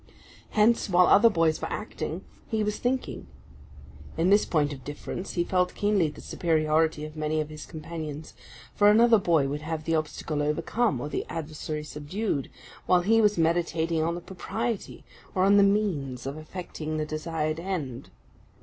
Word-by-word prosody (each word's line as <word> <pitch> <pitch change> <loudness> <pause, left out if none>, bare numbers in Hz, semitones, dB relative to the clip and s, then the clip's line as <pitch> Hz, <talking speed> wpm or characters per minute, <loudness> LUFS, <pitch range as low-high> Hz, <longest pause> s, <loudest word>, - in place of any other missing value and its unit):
Hence, 220 +1 +4
while 180 0 +6
other 220 +6 +6
boys 165 -5 +1
were - - -4
acting, - - -5 0.2
he 220 -2 0
was 210 0 -1
thinking. 255 +1 -2 0.9
In 170 +4 +3
this 205 +1 +5
point 150 -3 +1
of 130 -2 -10
difference, 145 +5 -6
he 175 - +1
felt 180 0 0
keenly 205 -5 +2
the 150 - -11
superiority 155 -1 +1
of 155 0 -10
many 155 0 -1
of 155 0 -2
his 155 0 -9
companions; 155 -2 -7 0.4
for 205 0 +5
another 225 +1 +6
boy 165 -7 +2
would 145 +2 -3
have 155 0 -4
the 165 - -1
obstacle 155 -1 -2
overcome, 150 - 0
or 145 - -4
the - - -2
adversary 155 -1 -5
subdued, 150 - -3 0.4
while 180 -1 +5
he 225 +5 +4
was 210 -2 +3
meditating 165 -1 +1
on 165 +2 0
the 175 - -6
propriety, 220 +5 -4 0.3
or 185 - +3
on 200 +1 +6
the - - +7
means, 180 - +1
of 135 +1 -4
effecting 155 -1 -6
the 155 - -1
desired 155 0 -2
end. 165 -9 -4
165 Hz, 170 wpm, -27 LUFS, 155-195 Hz, 0.9 s, the